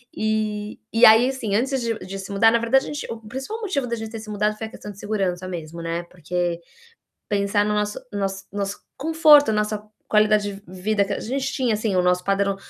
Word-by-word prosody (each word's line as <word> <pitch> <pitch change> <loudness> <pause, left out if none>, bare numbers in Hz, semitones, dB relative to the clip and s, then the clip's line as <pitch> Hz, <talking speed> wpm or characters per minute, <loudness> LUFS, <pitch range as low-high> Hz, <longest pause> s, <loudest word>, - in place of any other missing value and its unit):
E 215 -1 -1 0.2
e 230 +2 +7
aí, 225 +4 +7
assim, 230 -7 -2
antes 265 +5 +1
de 230 -2 -1
de 195 +1 -7
se 195 - -8
mudar 215 +3 +5
na 235 - +3
verdade 245 +4 +3
a - - -8
gente, 295 -1 -5
o 230 - -6
principal 265 - -6
motivo 320 - -1
da 235 - -1
gente 220 -1 -6
ter 225 - -6
se 215 0 -10
mudado 210 0 0
foi 220 0 -4
a - - -14
questão 210 - -9
de 200 - -14
segurança 190 -4 -2
mesmo, 170 -2 -6
né, 165 +1 -3
porque, 175 0 -2 0.7
pensar 205 0 +1
no 210 0 0
nosso 210 +2 -1
nosso 195 -1 -3
nosso 200 0 -3 0.2
conforto, 305 -3 +6
a - - +1
nossa 210 0 0 0.3
qualidade 210 -1 +3
de 200 - -12 0.2
vida 205 +1 +2
que 200 - -4
a - - -2
gente 270 +3 -2
tinha, 250 -4 +1
assim, 215 -1 -1
o 180 - +4
nosso 180 0 +2
padrão, 195 0 +1
210 Hz, 225 wpm, -23 LUFS, 195-230 Hz, 0.7 s, e